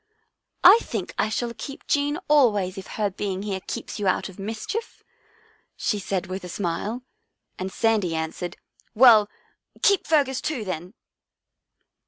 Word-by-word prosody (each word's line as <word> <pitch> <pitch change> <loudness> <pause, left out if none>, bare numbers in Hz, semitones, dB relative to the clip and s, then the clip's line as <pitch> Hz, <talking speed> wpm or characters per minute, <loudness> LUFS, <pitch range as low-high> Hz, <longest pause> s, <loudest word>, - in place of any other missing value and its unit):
" - - -50
I 460 - +10
think 210 -6 -5
I 215 - +2
shall 235 +2 -2
keep 275 -1 -8
Jean 290 +1 +1
always 210 -11 +3
if 195 -2 -8
her 210 -2 0
being 195 0 -3
here 200 -2 -3
keeps - - -5
you 205 - -1
out 185 - +1
of 190 - -14
mischief," 220 - -5 0.7
she 210 - -1
said 195 -2 -2
with 185 +1 -6
a 180 - -7
smile, 205 +7 -3 0.6
and 190 +1 -3
Sandy 210 -7 +1
answered, 160 +2 -4 0.2
" - - -35
Well, 220 -3 +7 0.5
keep 400 -5 +4
Fergus 280 -5 +2
too, 270 -8 -3
then." 180 +2 -5
210 Hz, 155 wpm, -24 LUFS, 185-250 Hz, 0.7 s, I